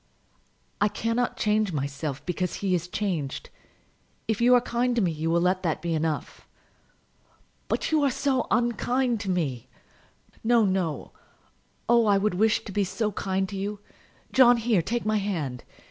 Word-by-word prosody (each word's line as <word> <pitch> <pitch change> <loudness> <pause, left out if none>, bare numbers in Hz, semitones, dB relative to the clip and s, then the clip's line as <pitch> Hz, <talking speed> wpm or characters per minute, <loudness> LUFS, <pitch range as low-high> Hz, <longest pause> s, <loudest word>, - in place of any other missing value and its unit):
"I 205 - +5
cannot 230 +3 -1
change 210 -3 +1
myself 140 0 -4
because 180 0 -2
he 195 -2 -1
is 175 -1 -1
changed. 175 -8 -3 0.8
If 220 0 -1
you 250 +1 +6
are 245 - +5
kind 245 0 0
to 235 - +2
me 175 - +1
you 160 +1 -3
will 170 +1 +2
let 185 +1 +1
that 165 -4 -1
be 170 0 -2
enough." 160 -1 -3 1.2
"But - - -1
you 310 -1 +3
are 280 - +3
so 265 0 0
unkind 240 +2 +1
to 205 -2 -4
me!" 135 -9 -2 0.7
"No, 230 -1 +4
no; 185 -6 -1 0.8
oh, 235 -1 +4
I 200 -1 +5
would 210 +1 +1
wish 215 +4 +2
to 205 - -7
be 205 +1 +1
so 210 +3 -2
kind 190 0 -1
to 200 - -6
you! 200 +1 -4 0.5
John, 245 -2 +6
here; 225 -5 +2
take 235 +8 -2
my 215 0 +2
hand. 160 - -3
200 Hz, 165 wpm, -26 LUFS, 170-235 Hz, 1.2 s, you